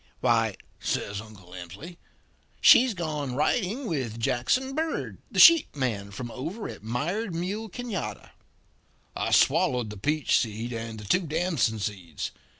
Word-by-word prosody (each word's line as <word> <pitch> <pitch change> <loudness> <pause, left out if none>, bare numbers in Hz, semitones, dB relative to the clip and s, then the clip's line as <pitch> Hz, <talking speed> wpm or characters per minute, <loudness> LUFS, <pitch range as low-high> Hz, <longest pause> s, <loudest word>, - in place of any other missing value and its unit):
"'Why,' - - +2 0.2
says 100 0 -2
Uncle 100 -5 -14
Emsley, 95 - -9 0.6
'she's 245 -2 +7
gone 150 -6 -3
riding 200 - 0
with 130 - -3
Jackson 135 - 0
Bird, 320 +2 -3
the - - -8
sheep 335 - +8
man 110 -8 -2
from 120 +4 -7
over 165 - -5
at - - -9
Mired 165 - -2
Mule 200 +6 -3
Canada.' 235 -3 -5 0.8
"I - - -1
swallowed 120 -4 +3
the 105 - -8
peach 150 +8 +2
seed 115 +2 -3
and 115 -1 -5
the - - -9
two 180 - +1
damson 155 -8 0
seeds. 95 -7 -5
135 Hz, 140 wpm, -27 LUFS, 110-185 Hz, 0.8 s, sheep